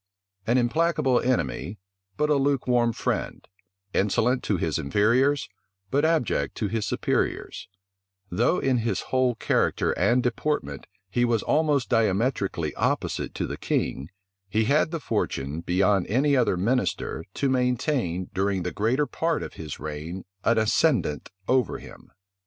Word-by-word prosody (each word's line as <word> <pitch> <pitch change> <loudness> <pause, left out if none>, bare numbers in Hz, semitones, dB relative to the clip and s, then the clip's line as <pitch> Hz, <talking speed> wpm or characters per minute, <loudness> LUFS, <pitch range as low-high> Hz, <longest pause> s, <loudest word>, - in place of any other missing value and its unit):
An 120 +3 +3
implacable 130 0 +2
enemy, 90 - -1 0.4
but 150 0 +1
a - - +5
lukewarm 125 -4 +2
friend; - - -3 0.5
insolent 115 +6 +2
to 100 - +1
his 80 -2 -1
inferiors, 120 - +2 0.4
but 145 +2 +2
abject 160 -6 +1
to 105 - -1
his 110 +1 -2
superiors; - - -1 0.6
though 120 - +2
in 130 -6 +1
his 110 -4 -1
whole 130 -2 +3
character - - +1
and 125 +1 +2
deportment 145 +5 -2 0.2
he 120 +6 0
was 120 -3 +1
almost 150 -4 +2
diametrically 100 - 0
opposite - - -1
to - - -1
the - - -5
king, 70 +4 -2 0.4
he 110 +3 +2
had 145 +6 +3
the 165 0 -3
fortune, 70 - -2
beyond 95 +2 +2
any 140 +6 +2
other 120 -8 +2
minister, 115 -4 -1
to 140 - 0
maintain, 125 - 0
during 95 -1 0
the - - -2
greater 125 +8 +1
part 165 +2 -1
of - - -7
his 75 -3 -7
reign, 80 +5 -6 0.2
an 115 - +3
ascendant 110 - +1 0.2
over 125 -4 +2
him. - - -13
120 Hz, 140 wpm, -25 LUFS, 95-135 Hz, 0.6 s, a